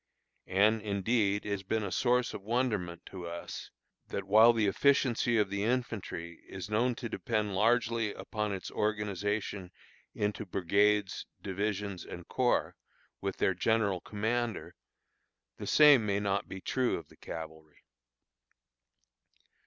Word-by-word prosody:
And, 105 Hz, +4 st, +3 dB
indeed, 105 Hz, 0 st, 0 dB
it 105 Hz, -, -3 dB
has 100 Hz, -1 st, -1 dB
been 110 Hz, +3 st, -1 dB
a 95 Hz, -, -3 dB
source 125 Hz, -1 st, +2 dB
of -, -, -6 dB
wonderment 105 Hz, -6 st, -1 dB
to 90 Hz, -3 st, -7 dB
us, 85 Hz, 0 st, -7 dB, 0.4 s
that 100 Hz, -, -3 dB
while 110 Hz, +4 st, +7 dB
the 115 Hz, -2 st, +1 dB
efficiency 120 Hz, +2 st, +3 dB
of 105 Hz, -2 st, +1 dB
the 100 Hz, 0 st, -1 dB
infantry 105 Hz, -8 st, -3 dB
is 95 Hz, +2 st, -7 dB
known 120 Hz, +3 st, +2 dB
to 120 Hz, -, -5 dB
depend 105 Hz, 0 st, -2 dB
largely 115 Hz, +1 st, +2 dB
upon 105 Hz, 0 st, -3 dB
its 95 Hz, -1 st, -5 dB
organization 105 Hz, -2 st, -2 dB, 0.5 s
into 105 Hz, +1 st, -1 dB
brigades, 100 Hz, +2 st, +1 dB, 0.2 s
divisions, 100 Hz, -1 st, -2 dB
and 85 Hz, -1 st, -9 dB
corps, 125 Hz, -2 st, +1 dB, 0.5 s
with 100 Hz, -1 st, -3 dB
their 95 Hz, -, +2 dB
general 100 Hz, 0 st, +1 dB
commander, 110 Hz, +2 st, -2 dB, 0.8 s
the -, -, -6 dB
same 145 Hz, -6 st, +7 dB
may 100 Hz, -1 st, 0 dB
not 100 Hz, 0 st, -1 dB
be 95 Hz, -, -7 dB
true 130 Hz, +4 st, 0 dB
of -, -, -10 dB
the -, -, -19 dB
cavalry. 80 Hz, -1 st, -9 dB
105 Hz, 135 wpm, -31 LUFS, 95-115 Hz, 0.8 s, while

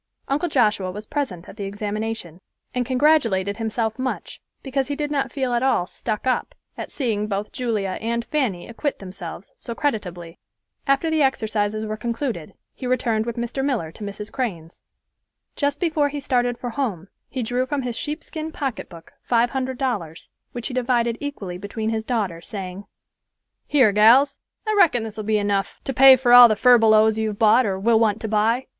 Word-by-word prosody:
Uncle 295 Hz, +6 st, 0 dB
Joshua 210 Hz, -9 st, +2 dB
was 210 Hz, +4 st, -7 dB
present 210 Hz, -, -4 dB
at -, -, -12 dB
the 200 Hz, -, -4 dB
examination, 205 Hz, -3 st, -4 dB, 0.3 s
and 250 Hz, -1 st, -1 dB
congratulated 250 Hz, -8 st, +2 dB
himself 225 Hz, +1 st, -2 dB
much 260 Hz, 0 st, -4 dB, 0.2 s
because 270 Hz, -1 st, -1 dB
he 285 Hz, -, -2 dB
did 295 Hz, 0 st, -3 dB
not 275 Hz, -3 st, -1 dB
feel 260 Hz, -3 st, -1 dB
at 240 Hz, -, +1 dB
all 260 Hz, -9 st, +2 dB
"stuck 215 Hz, +4 st, -4 dB
up" 255 Hz, -, -1 dB, 0.2 s
at -, -, -6 dB
seeing 220 Hz, -6 st, -2 dB
both 205 Hz, 0 st, -3 dB
Julia 215 Hz, -6 st, -2 dB
and 235 Hz, +1 st, -2 dB
Fanny 250 Hz, -13 st, -1 dB
acquit 275 Hz, +5 st, -3 dB
themselves 185 Hz, -1 st, -9 dB
so 235 Hz, -, -6 dB
creditably. 180 Hz, -, -3 dB, 0.5 s
After 275 Hz, +4 st, +2 dB
the 315 Hz, -1 st, +2 dB
exercises 215 Hz, -5 st, 0 dB
were 215 Hz, 0 st, -4 dB
concluded, 235 Hz, -, -4 dB, 0.2 s
he 255 Hz, -, -6 dB
returned 235 Hz, -3 st, 0 dB
with 235 Hz, 0 st, -4 dB
Mr. 240 Hz, +3 st, -2 dB
Miller 235 Hz, -, -1 dB
to 210 Hz, -, -10 dB
Mrs. 205 Hz, +1 st, -6 dB
Crane's. 180 Hz, -11 st, -4 dB, 0.7 s
Just 285 Hz, 0 st, -1 dB
before 310 Hz, -4 st, +1 dB
he 290 Hz, +1 st, -4 dB
started 245 Hz, -3 st, 0 dB
for 245 Hz, -1 st, -5 dB
home 215 Hz, -, -3 dB, 0.2 s
he 255 Hz, -, -3 dB
drew 245 Hz, +3 st, -1 dB
from 280 Hz, -1 st, -2 dB
his 245 Hz, -2 st, -3 dB
sheepskin 310 Hz, +3 st, -5 dB
pocketbook 230 Hz, -, -6 dB
five 235 Hz, 0 st, +2 dB
hundred 260 Hz, -1 st, -2 dB
dollars, 195 Hz, -, -3 dB, 0.2 s
which 240 Hz, -2 st, -5 dB
he -, -, -6 dB
divided 240 Hz, -2 st, +1 dB
equally 200 Hz, -12 st, -5 dB
between 220 Hz, +3 st, -3 dB
his 220 Hz, 0 st, -2 dB
daughters, 200 Hz, -9 st, -2 dB
saying, 195 Hz, -1 st, -6 dB, 0.8 s
"Here, 255 Hz, -8 st, +4 dB
gals, 235 Hz, +7 st, +5 dB, 0.3 s
I 430 Hz, -, 0 dB
reckon 310 Hz, -, +4 dB
this 220 Hz, -1 st, -7 dB
will 215 Hz, -, -5 dB
be 215 Hz, 0 st, +2 dB
enough 205 Hz, -1 st, -1 dB
to 270 Hz, -, -3 dB
pay 265 Hz, +1 st, +9 dB
for 245 Hz, -1 st, +2 dB
all 245 Hz, 0 st, +11 dB
the 215 Hz, -, +1 dB
furbelows 220 Hz, -2 st, +5 dB
you've 215 Hz, -2 st, -2 dB
bought 225 Hz, +3 st, +5 dB
or 190 Hz, -1 st, -1 dB
will 225 Hz, +2 st, +3 dB
want 215 Hz, -2 st, +2 dB
to 220 Hz, -, -3 dB
buy. 220 Hz, +4 st, +1 dB
230 Hz, 180 wpm, -23 LUFS, 210-265 Hz, 0.8 s, all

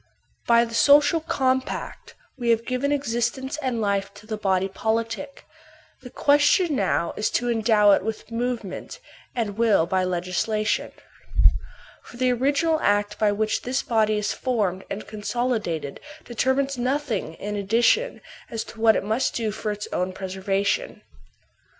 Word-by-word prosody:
By 235 Hz, 0 st, +5 dB
the 230 Hz, -, -9 dB
social 290 Hz, +6 st, +5 dB
compact 260 Hz, -5 st, -2 dB, 0.2 s
we 240 Hz, -4 st, -2 dB
have 230 Hz, 0 st, +2 dB
given 255 Hz, +3 st, -1 dB
existence 265 Hz, 0 st, -1 dB
and 255 Hz, -4 st, -1 dB
fife 200 Hz, -2 st, 0 dB
to 210 Hz, -, -14 dB
the 215 Hz, 0 st, -3 dB
body 195 Hz, -2 st, +1 dB
politic; 225 Hz, +7 st, -3 dB, 0.6 s
the 250 Hz, -, -10 dB
question 290 Hz, +5 st, +3 dB
now 185 Hz, -6 st, 0 dB
is 210 Hz, -, 0 dB
to 245 Hz, 0 st, 0 dB
endow 220 Hz, -2 st, +4 dB
it -, -, +3 dB
with 220 Hz, +1 st, -5 dB
movement, 230 Hz, -4 st, -4 dB, 0.4 s
and 220 Hz, -3 st, -2 dB
will 215 Hz, -8 st, +4 dB
by 185 Hz, +2 st, 0 dB
legislation. 185 Hz, +4 st, -1 dB, 1.1 s
For 240 Hz, -, -14 dB
the 255 Hz, 0 st, +2 dB
original 285 Hz, +6 st, +1 dB
act 205 Hz, -2 st, +1 dB
by 210 Hz, -1 st, +3 dB
which 215 Hz, +1 st, 0 dB
this 255 Hz, +1 st, -1 dB
body 215 Hz, -2 st, +2 dB
is 210 Hz, 0 st, -1 dB
formed 205 Hz, -7 st, -1 dB
and 205 Hz, -, -5 dB
consolidated 215 Hz, -, -2 dB, 0.3 s
deter 255 Hz, +2 st, +1 dB
mines 275 Hz, -1 st, -1 dB
nothing 250 Hz, -, -1 dB
in 210 Hz, +4 st, -5 dB
addition 230 Hz, -, +2 dB, 0.3 s
as 225 Hz, -1 st, -3 dB
to 225 Hz, -, -12 dB
what 225 Hz, -1 st, +6 dB
it -, -, 0 dB
must 220 Hz, +6 st, 0 dB
do 225 Hz, -2 st, -1 dB
for 215 Hz, 0 st, -3 dB
its 210 Hz, 0 st, -5 dB
own 180 Hz, +1 st, -1 dB
preservation. 195 Hz, +1 st, -2 dB
225 Hz, 150 wpm, -24 LUFS, 205-255 Hz, 1.1 s, what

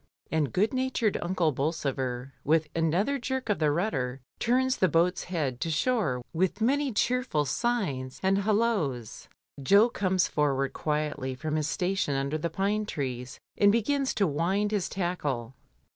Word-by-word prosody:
And 155 Hz, -4 st, +1 dB
good 205 Hz, +6 st, +1 dB
natured 255 Hz, -5 st, 0 dB
Unde 175 Hz, -3 st, +1 dB
Bolsover, 135 Hz, -3 st, -2 dB
with 155 Hz, +1 st, +2 dB
another 175 Hz, -, +1 dB
jerk 260 Hz, 0 st, -3 dB
of 210 Hz, -, +1 dB
the 155 Hz, -2 st, +3 dB
rudder, 140 Hz, -7 st, -1 dB, 0.2 s
turns 260 Hz, +2 st, +2 dB
the 185 Hz, -, +4 dB
boat's 175 Hz, +2 st, +1 dB
head 145 Hz, -9 st, -2 dB
to 165 Hz, -, -1 dB
shore 160 Hz, -, 0 dB
with 185 Hz, +4 st, 0 dB
many 275 Hz, +4 st, +2 dB
cheerful 245 Hz, -, +1 dB
signs 140 Hz, -, -1 dB
and 195 Hz, +1 st, +3 dB
halloas. 200 Hz, -, 0 dB, 0.3 s
Jo 200 Hz, -, +5 dB
comes 185 Hz, -4 st, +1 dB
forward 140 Hz, -2 st, 0 dB
quietly 150 Hz, -3 st, -2 dB
from 155 Hz, +4 st, -3 dB
his 155 Hz, -1 st, 0 dB
station 180 Hz, -4 st, 0 dB
under 140 Hz, +3 st, -1 dB
the 170 Hz, +2 st, -1 dB
pine 205 Hz, +5 st, -1 dB
trees, 130 Hz, -, -4 dB, 0.2 s
and 205 Hz, 0 st, +6 dB
begins 265 Hz, +5 st, +1 dB
to 200 Hz, -, +3 dB
wind 185 Hz, +7 st, 0 dB
his 205 Hz, -4 st, 0 dB
tackle. 145 Hz, -10 st, -2 dB
170 Hz, 150 wpm, -28 LUFS, 140-210 Hz, 0.3 s, and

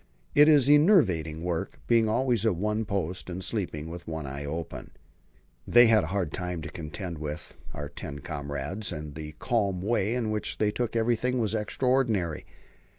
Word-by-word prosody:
It 150 Hz, +1 st, +7 dB
is 145 Hz, -4 st, +6 dB
enervating 115 Hz, -, +4 dB
work 85 Hz, -2 st, -3 dB
being 115 Hz, -2 st, +3 dB
always 120 Hz, -1 st, +2 dB
at 110 Hz, -5 st, +2 dB
one's 105 Hz, +4 st, -1 dB
post, 95 Hz, -3 st, -2 dB
and 90 Hz, +1 st, -5 dB
sleeping 85 Hz, -9 st, -3 dB
with 85 Hz, +1 st, -8 dB
one 80 Hz, -2 st, -4 dB
eye 70 Hz, +1 st, -5 dB
open. 80 Hz, +2 st, -5 dB, 0.8 s
They 120 Hz, 0 st, +7 dB
had 110 Hz, -5 st, +4 dB
a -, -, -6 dB
hard 95 Hz, -3 st, -1 dB
time 90 Hz, -3 st, -4 dB
to 85 Hz, -, -5 dB
contend 85 Hz, 0 st, -6 dB
with, 75 Hz, +3 st, -6 dB, 0.2 s
our 75 Hz, 0 st, -5 dB
ten 70 Hz, 0 st, -7 dB
comrades, 75 Hz, +6 st, -4 dB
and 75 Hz, -1 st, -6 dB
the 75 Hz, 0 st, -7 dB
calm 100 Hz, 0 st, 0 dB
way 105 Hz, +2 st, 0 dB
in 115 Hz, -3 st, -1 dB
which 105 Hz, 0 st, -1 dB
they 105 Hz, -1 st, +2 dB
took 120 Hz, +1 st, -2 dB
everything 120 Hz, +2 st, +1 dB
was 110 Hz, -3 st, 0 dB
extraordinary. 110 Hz, -, 0 dB
95 Hz, 170 wpm, -28 LUFS, 80-115 Hz, 0.8 s, It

